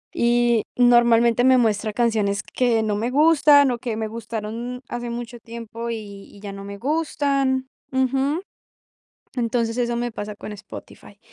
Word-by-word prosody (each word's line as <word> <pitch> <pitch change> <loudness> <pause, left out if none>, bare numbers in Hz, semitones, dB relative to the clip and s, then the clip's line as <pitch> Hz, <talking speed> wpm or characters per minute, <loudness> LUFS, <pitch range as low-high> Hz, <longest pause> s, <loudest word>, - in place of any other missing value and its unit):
y 240 -1 +3 0.2
normalmente 240 -1 +5
me 260 0 +6
muestra 220 -2 +1
canciones 215 -3 +1
que 235 -3 +2
no 210 -1 0
me 230 +4 -1
gustan, 290 -2 +5
o 240 - -3
que 230 -2 -4
me 220 -1 -2
gustaron 230 +2 -5
hace 240 0 -4
mucho 240 0 -6
tiempo 230 0 -7
y 200 -3 -8
y - - -14
ya 200 -1 -7
no 195 0 -8
me 200 0 -7
gustan 275 -1 0 0.2
ujú. 270 +5 0 0.9
Entonces 235 -1 -1
eso 240 -1 0
me 240 0 -2
pasa 210 -1 -6
con 210 - -8
Spotify. 200 - -12
235 Hz, 155 wpm, -22 LUFS, 220-250 Hz, 0.9 s, me